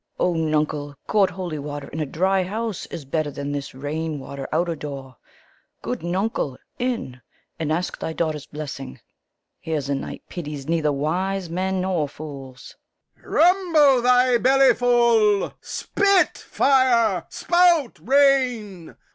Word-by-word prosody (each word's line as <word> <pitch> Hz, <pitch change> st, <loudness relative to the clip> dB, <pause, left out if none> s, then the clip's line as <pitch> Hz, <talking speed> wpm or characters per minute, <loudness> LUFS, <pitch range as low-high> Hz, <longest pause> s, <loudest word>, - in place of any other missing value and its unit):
Fool. 180 Hz, -, +2 dB
O -, -, -1 dB
nuncle, 150 Hz, -2 st, -1 dB
court 205 Hz, -3 st, +3 dB
holy 175 Hz, -5 st, -5 dB
water 145 Hz, 0 st, -6 dB
in 155 Hz, -, -6 dB
a 155 Hz, -, -1 dB
dry 190 Hz, +7 st, +1 dB
house 215 Hz, +3 st, -4 dB
is 150 Hz, -, -8 dB
better 155 Hz, +2 st, -1 dB
than 140 Hz, 0 st, -5 dB
this 140 Hz, -2 st, -5 dB
rain 150 Hz, +3 st, -3 dB
water 135 Hz, 0 st, -7 dB
out 170 Hz, +3 st, +1 dB
o' 170 Hz, -, -1 dB
door. 140 Hz, -4 st, -8 dB, 0.7 s
Good -, -, -3 dB
nuncle, 175 Hz, -, -2 dB, 0.2 s
in, 235 Hz, -, -3 dB, 0.4 s
and 155 Hz, -1 st, -2 dB
ask 175 Hz, +3 st, -2 dB
thy -, -, -3 dB
daughters 155 Hz, -3 st, -2 dB
blessing! 135 Hz, -3 st, -7 dB, 0.6 s
Here's 150 Hz, -4 st, -3 dB
a -, -, +1 dB
night 135 Hz, -, -5 dB
pities 150 Hz, -5 st, -7 dB
nether 160 Hz, -2 st, +1 dB
wise 175 Hz, +5 st, -2 dB
men 185 Hz, +1 st, -1 dB
nor 180 Hz, -6 st, -1 dB
fools. 135 Hz, -3 st, -10 dB, 0.4 s
Lear. -, -, -17 dB
Rumble 325 Hz, -7 st, +4 dB
thy 250 Hz, 0 st, +4 dB
bellyful! 240 Hz, -5 st, +4 dB
Spit, 395 Hz, -2 st, +1 dB
fire! 235 Hz, -9 st, +2 dB
spout, 345 Hz, -7 st, +2 dB
rain! 250 Hz, -, +2 dB
175 Hz, 140 wpm, -23 LUFS, 145-235 Hz, 0.7 s, Rumble